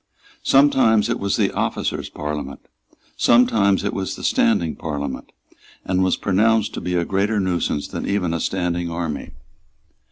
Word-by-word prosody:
Sometimes 125 -6 +4
it 120 - -1
was 100 0 -1
the - - +1
Officers' - - -2
Parliament; 75 -2 -5 0.5
sometimes 105 -5 +3
it 100 - -2
was 95 -1 -3
the - - -10
Standing 80 -2 +2
Parliament, 70 -3 -5 0.5
and 95 0 +1
was 95 - +1
pronounced 110 +3 +2
to - - -5
be 90 +1 -2
a 85 -1 +1
greater 100 +3 0
nuisance 90 -6 -1
than - - -5
even 95 -4 0
a 85 - -1
standing 90 -1 -2
army. 85 -3 -4
95 Hz, 150 wpm, -21 LUFS, 85-105 Hz, 0.5 s, Sometimes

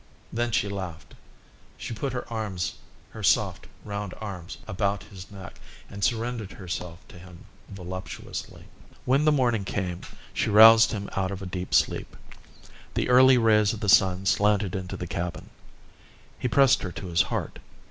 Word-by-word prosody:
Then 120 +1 0
she 105 - +1
laughed. 95 -5 -7 0.6
She - - -6
put 135 +5 -3
her 125 0 -5
arms, 95 -7 -3 0.4
her - - -9
soft, - - +1 0.2
round 100 -2 -5
arms, 95 -5 -7
about 100 +1 -1
his 95 -3 -12
neck, 100 -2 -11 0.3
and 100 0 -6
surrendered 115 -3 -1
herself 90 -2 -7
to 90 - -13
him 90 -1 -14 0.2
voluptuously. 95 -1 -7 0.4
When 135 +4 +2
the 155 - +5
morning 120 -7 +1
came 95 -2 -3 0.3
she - - 0
roused 110 +2 +8
him 100 -2 -4
out 95 -1 0
of 100 0 -6
a - - -5
deep 90 0 -3
sleep. - - 0 0.8
The - - 0
early 130 +1 +7
rays 105 -3 +4
of 110 - -6
the 105 - -1
sun 95 0 +4
slanted 100 -1 +2
into 95 -1 -5
the 90 - -5
cabin. 85 0 -5 0.9
He - - -1
pressed 135 +1 +4
her 90 - -4
to - - -7
his 85 -2 +2
heart. - - -4
100 Hz, 160 wpm, -26 LUFS, 90-115 Hz, 0.9 s, roused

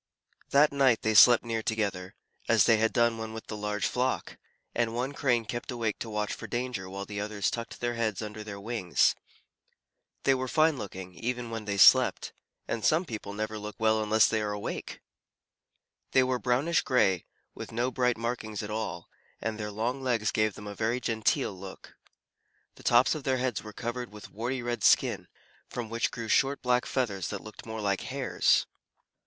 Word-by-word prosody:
That 145 +2 +5
night 135 -5 +3
they 110 - +2
slept 120 +3 +8
near 115 -1 -2
together, 100 -4 -2 0.3
as - - +6
they 115 - +5
had 110 +1 +2
done 120 -1 +2
when 110 0 -5
with 110 - -7
the 105 - -6
large 105 0 -2
flock, 125 +1 -1 0.3
and 115 -1 0
one 125 +3 -1
Crane 120 -5 +1
kept 120 +5 -5
awake 115 -4 -2
to 115 - -5
watch 105 -1 -2
for - - -7
danger 120 -6 -3
while 100 +1 -5
the 100 0 -5
others 105 -2 -1
tucked 115 -1 -6
their 120 0 -1
heads 110 -4 -1
under 105 0 -6
their 100 -2 -7
wings. 105 -4 +1 1.1
They 135 - +4
were 130 0 -2
fine 155 +3 +3
looking, 95 -2 -7
even 120 +5 -4
when 115 -2 -5
they 100 -1 -2
slept, - - +6 0.3
and 115 - -3
some 165 +4 +3
people 110 -7 -6
never 110 +1 -3
look 105 0 -7
well 110 -1 +2
unless 110 +1 +4
they 110 - 0
are 105 -1 -2
awake. 105 0 -5 1.1
They 130 - +6
were 130 -1 0
brownish 130 +8 +2
gray, 95 -8 +2 0.3
with - - -8
no 120 +3 -1
bright 125 -2 +1
markings 115 -3 -3
at 105 - -5
all, 110 +1 -4 0.3
and 110 0 -3
their 105 -1 -3
long 115 +6 -2
legs 115 -5 0
gave 110 -2 +1
them 105 - -10
a 105 - -6
very 115 +4 -1
genteel 110 -4 0
look. 95 0 -11 0.8
The - - -16
tops 120 +1 +4
of 155 -3 -5
their 130 -1 +1
heads 125 -4 -1
were 105 - -9
covered 120 +2 -5
with 105 0 -11
warty 120 +4 -3
red 120 -3 -3
skin, - - +3 0.4
from 115 -3 -5
which 115 0 0
grew 115 -1 -6
short 135 +5 +2
black 125 0 +2
feathers 100 -9 -1
that 100 - -5
looked 110 +1 -11
more 110 -1 -5
like 100 -2 0
hairs. 135 -1 +1
115 Hz, 190 wpm, -29 LUFS, 105-125 Hz, 1.1 s, slept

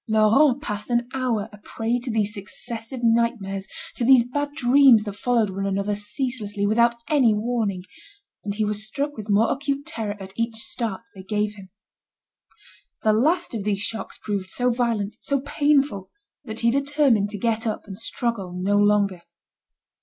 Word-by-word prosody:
Laurent 225 +6 +4
passed 210 -3 -4
an 240 0 +1
hour 245 -6 -1
a 210 - -12
prey 225 +3 -2
to 245 +1 -5
these 210 -2 0
successive 225 +4 -7
nightmares, 225 -4 +1 0.3
to - - -3
these 245 -1 +6
bad 290 +3 -2
dreams 255 -4 +6
that 205 -2 -5
followed 225 -1 +1
one 195 +1 -3
another 200 +1 -1
ceaselessly, 210 -1 -3
without 235 +3 +3
any 265 -9 +4
warning, 210 -4 -1 0.6
and 200 -1 -3
he 215 0 0
was 210 0 -1
struck 285 +7 -3
with 215 0 -8
more 210 +3 +3
acute 280 0 -3
terror 215 -2 -4
at 190 0 -9
each 230 0 -1
start 225 -1 -2
they 190 - -10
gave 210 +2 -1
him. 195 -2 -13 1.3
The 215 - +4
last 315 +11 +1
of 220 -3 -3
these 200 -1 -1
shocks 225 - -4
proved 200 -3 -4
so 245 +4 +1
violent, 230 -3 -1
so 280 -1 0
painful 285 -8 +1 0.4
that 220 -1 -6
he 235 0 +3
determined 275 -6 +2
to 210 - -6
get 225 +2 -1
up, 215 - -3
and 195 -2 -8
struggle 225 -3 -3
no 200 +3 +2
longer. 205 -3 +2
225 Hz, 170 wpm, -24 LUFS, 205-245 Hz, 1.3 s, these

